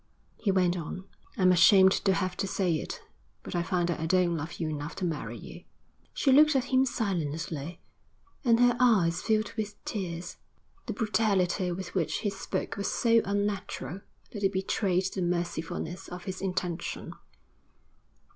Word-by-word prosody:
He 210 Hz, -, -1 dB
went 180 Hz, -2 st, +2 dB
on. 180 Hz, +2 st, -5 dB, 0.3 s
'I'm 185 Hz, -1 st, +5 dB
ashamed 190 Hz, +1 st, +7 dB
to 195 Hz, 0 st, +2 dB
have 185 Hz, -1 st, -1 dB
to 195 Hz, -, -1 dB
say 185 Hz, -3 st, 0 dB
it; -, -, -6 dB, 0.5 s
I 175 Hz, -, +1 dB
find 175 Hz, 0 st, 0 dB
that 170 Hz, -, -2 dB
I 160 Hz, -, -2 dB
don't 180 Hz, -1 st, +3 dB
love 160 Hz, +1 st, -4 dB
you 165 Hz, -, -3 dB
enough 150 Hz, 0 st, -4 dB
to 185 Hz, -, -2 dB
marry 160 Hz, -4 st, -3 dB
you.' -, -, -11 dB, 0.5 s
She 275 Hz, -, +2 dB
looked 300 Hz, +2 st, +6 dB
at 260 Hz, 0 st, 0 dB
him 260 Hz, +1 st, +5 dB
silently, 165 Hz, -, -3 dB, 0.6 s
and 235 Hz, -3 st, +4 dB
her 245 Hz, 0 st, +5 dB
eyes 190 Hz, -9 st, +3 dB
filled 215 Hz, -1 st, 0 dB
with 210 Hz, -2 st, -4 dB
tears. 180 Hz, -4 st, -4 dB, 0.5 s
The -, -, -2 dB
brutality 200 Hz, -5 st, +1 dB
with 180 Hz, +1 st, -5 dB
which 175 Hz, -5 st, -1 dB
he 205 Hz, -, 0 dB
spoke 195 Hz, -, -4 dB
was 200 Hz, -, -1 dB
so 230 Hz, -1 st, +3 dB
unnatural 200 Hz, -5 st, -2 dB, 0.3 s
that 205 Hz, -, -6 dB
it 195 Hz, -, +3 dB
betrayed 190 Hz, -1 st, 0 dB
the 190 Hz, -, -3 dB
mercifulness 175 Hz, +1 st, -3 dB
of 180 Hz, 0 st, -8 dB
his 190 Hz, 0 st, -5 dB
intention. 180 Hz, -2 st, -3 dB
185 Hz, 160 wpm, -29 LUFS, 175-205 Hz, 0.6 s, ashamed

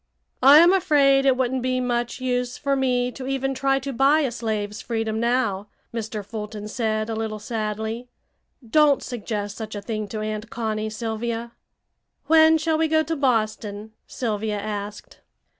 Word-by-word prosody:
"I 275 Hz, +3 st, +9 dB
am 340 Hz, +3 st, +7 dB
afraid 280 Hz, -7 st, +4 dB
it 260 Hz, -1 st, +4 dB
wouldn't 260 Hz, 0 st, 0 dB
be 255 Hz, 0 st, 0 dB
much 240 Hz, 0 st, -1 dB
use 250 Hz, -1 st, -1 dB
for 280 Hz, -1 st, 0 dB
me 250 Hz, -2 st, +1 dB
to 260 Hz, +1 st, -8 dB
even 270 Hz, 0 st, -1 dB
try 270 Hz, +1 st, +1 dB
to 275 Hz, +1 st, -4 dB
buy 275 Hz, +5 st, +4 dB
a 270 Hz, -5 st, 0 dB
slave's 215 Hz, -3 st, -3 dB
freedom 225 Hz, -2 st, -2 dB
now," 230 Hz, -4 st, 0 dB, 0.3 s
Mr. 220 Hz, -2 st, -4 dB
Fulton 210 Hz, 0 st, -6 dB
said 215 Hz, -1 st, -1 dB
a 225 Hz, -, -3 dB
little 220 Hz, -1 st, -3 dB
sadly. 220 Hz, +2 st, -4 dB, 0.6 s
"Don't 295 Hz, +3 st, +4 dB
suggest 210 Hz, -4 st, -4 dB
such 220 Hz, -1 st, -6 dB
a -, -, -3 dB
thing 215 Hz, 0 st, -3 dB
to 215 Hz, +2 st, -5 dB
Aunt 215 Hz, +1 st, -4 dB
Connie, 220 Hz, -2 st, -2 dB
Sylvia." 230 Hz, +1 st, -4 dB, 0.7 s
"When 320 Hz, 0 st, +6 dB
shall 315 Hz, 0 st, 0 dB
we 320 Hz, -, +3 dB
go 315 Hz, 0 st, +3 dB
to 325 Hz, +1 st, -2 dB
Boston?" 215 Hz, -5 st, -1 dB, 0.2 s
Sylvia 215 Hz, -3 st, -2 dB
asked. 205 Hz, 0 st, -6 dB
235 Hz, 160 wpm, -23 LUFS, 215-270 Hz, 0.7 s, I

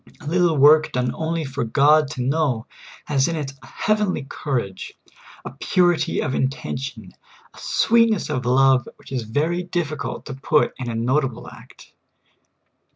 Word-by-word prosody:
A -, -, -14 dB
little 170 Hz, 0 st, +2 dB
w^ork 155 Hz, +3 st, +5 dB
done 125 Hz, -1 st, 0 dB
only 160 Hz, 0 st, -2 dB
for 135 Hz, 0 st, -3 dB
God 145 Hz, +5 st, +4 dB
to 125 Hz, -, -3 dB
know 135 Hz, -4 st, 0 dB, 0.4 s
has 135 Hz, -1 st, +1 dB
in 170 Hz, -, -2 dB
it 140 Hz, -4 st, -4 dB
a 120 Hz, -, -14 dB
heavenly 210 Hz, -, -1 dB
courage, 120 Hz, -13 st, -4 dB, 0.5 s
a -, -, -6 dB
purity 175 Hz, -3 st, +1 dB
of 130 Hz, -, -2 dB
intention, 130 Hz, -5 st, -3 dB, 0.4 s
a -, -, -15 dB
sweet 230 Hz, 0 st, +3 dB
ness 215 Hz, -5 st, -1 dB
of 130 Hz, -4 st, -2 dB
love, 130 Hz, 0 st, +3 dB
which -, -, -17 dB
is 130 Hz, -2 st, -2 dB
very 150 Hz, +11 st, -1 dB
difficult 175 Hz, -4 st, -4 dB
to 140 Hz, -, -6 dB
put 150 Hz, +3 st, +1 dB
in 125 Hz, -2 st, -4 dB
a 115 Hz, -, -3 dB
notable 125 Hz, +2 st, -1 dB
act. -, -, -15 dB
145 Hz, 160 wpm, -22 LUFS, 130-160 Hz, 0.5 s, w^ork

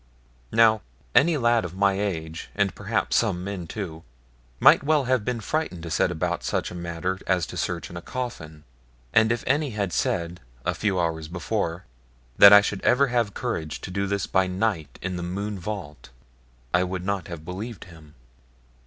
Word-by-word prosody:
Now, 110 Hz, -1 st, +5 dB, 0.3 s
any 160 Hz, +2 st, +5 dB
lad 120 Hz, -3 st, +3 dB
of 90 Hz, 0 st, -6 dB
my 100 Hz, 0 st, +3 dB
age, 80 Hz, -5 st, -3 dB
and 100 Hz, -2 st, +1 dB
perhaps -, -, 0 dB
some 90 Hz, 0 st, +1 dB
men 95 Hz, -3 st, -5 dB
too, 85 Hz, -4 st, -6 dB, 0.6 s
might -, -, +7 dB
well 150 Hz, 0 st, +2 dB
have 130 Hz, -3 st, +1 dB
been 125 Hz, +1 st, -2 dB
frightened 110 Hz, -, -2 dB
to 85 Hz, -, -6 dB
set -, -, +2 dB
about 85 Hz, +1 st, -2 dB
such -, -, -1 dB
a -, -, -7 dB
matter 85 Hz, +2 st, -3 dB
as 90 Hz, -3 st, +2 dB
to -, -, -9 dB
search -, -, -2 dB
in -, -, -9 dB
a 85 Hz, -, -5 dB
coffin; 80 Hz, -11 st, -6 dB, 0.5 s
and 110 Hz, +1 st, +5 dB
if 115 Hz, 0 st, -1 dB
any 145 Hz, +2 st, +1 dB
had 100 Hz, -4 st, -1 dB
said, 85 Hz, +1 st, -1 dB, 0.3 s
a -, -, +1 dB
few 100 Hz, -4 st, 0 dB
hours 80 Hz, -2 st, -1 dB
before, 90 Hz, 0 st, -3 dB, 0.5 s
that 100 Hz, -, +11 dB
I 105 Hz, 0 st, +10 dB
should 100 Hz, -1 st, -3 dB
ever 135 Hz, +2 st, +3 dB
have 120 Hz, -4 st, 0 dB
courage 85 Hz, -11 st, -3 dB
to -, -, -7 dB
do 100 Hz, +1 st, -1 dB
this 100 Hz, -1 st, -1 dB
by 95 Hz, -1 st, +2 dB
night 90 Hz, -5 st, -2 dB
in 90 Hz, -1 st, -2 dB
the -, -, -4 dB
Mohune 100 Hz, +3 st, -4 dB
vault, 90 Hz, -8 st, -6 dB, 0.6 s
I 90 Hz, +1 st, +4 dB
would 90 Hz, 0 st, -4 dB
not 100 Hz, -3 st, -2 dB
have 85 Hz, -3 st, -8 dB
believed 105 Hz, +6 st, -6 dB
him. 80 Hz, -4 st, -16 dB
95 Hz, 185 wpm, -25 LUFS, 85-110 Hz, 0.6 s, that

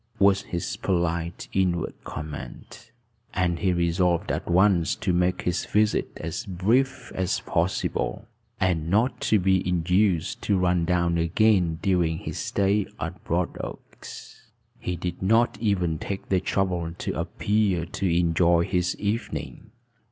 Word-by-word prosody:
was 100 Hz, -1 st, +4 dB
his 85 Hz, +1 st, -4 dB
polite 85 Hz, -2 st, -1 dB
inward 90 Hz, -3 st, 0 dB
comment. 75 Hz, -1 st, -8 dB, 0.5 s
And 85 Hz, -3 st, +1 dB
he 95 Hz, -3 st, +2 dB
resolved 85 Hz, 0 st, +1 dB
at -, -, -3 dB
once 90 Hz, -1 st, +3 dB
to 95 Hz, -4 st, -1 dB
make 90 Hz, +1 st, +1 dB
his 90 Hz, -1 st, 0 dB
visit 105 Hz, 0 st, +2 dB
as 85 Hz, +7 st, -4 dB
brief 120 Hz, +6 st, 0 dB
as 95 Hz, -1 st, -1 dB
possible, 95 Hz, +5 st, -1 dB, 0.3 s
and 85 Hz, -4 st, 0 dB
not 110 Hz, +8 st, +1 dB
to 110 Hz, -, +3 dB
be 95 Hz, -1 st, +2 dB
induced 90 Hz, 0 st, +1 dB
to 100 Hz, -, +1 dB
run 90 Hz, -2 st, +2 dB
down 85 Hz, -1 st, +1 dB
again 90 Hz, -1 st, +2 dB
during 90 Hz, -5 st, +2 dB
his -, -, -6 dB
stay 100 Hz, 0 st, +1 dB
at -, -, -5 dB
Broadoaks. 85 Hz, +1 st, -5 dB, 0.3 s
He 90 Hz, -, -3 dB
did 90 Hz, +1 st, -5 dB
not 115 Hz, +2 st, +2 dB
even 90 Hz, -7 st, 0 dB
take 100 Hz, -1 st, -5 dB
the 95 Hz, -, +3 dB
trouble 90 Hz, -3 st, -1 dB
to -, -, -3 dB
appear 100 Hz, -5 st, 0 dB
to 85 Hz, 0 st, -1 dB
enjoy 85 Hz, 0 st, +3 dB
his 90 Hz, -1 st, 0 dB
evening. 105 Hz, +3 st, -3 dB
90 Hz, 135 wpm, -25 LUFS, 85-100 Hz, 0.5 s, was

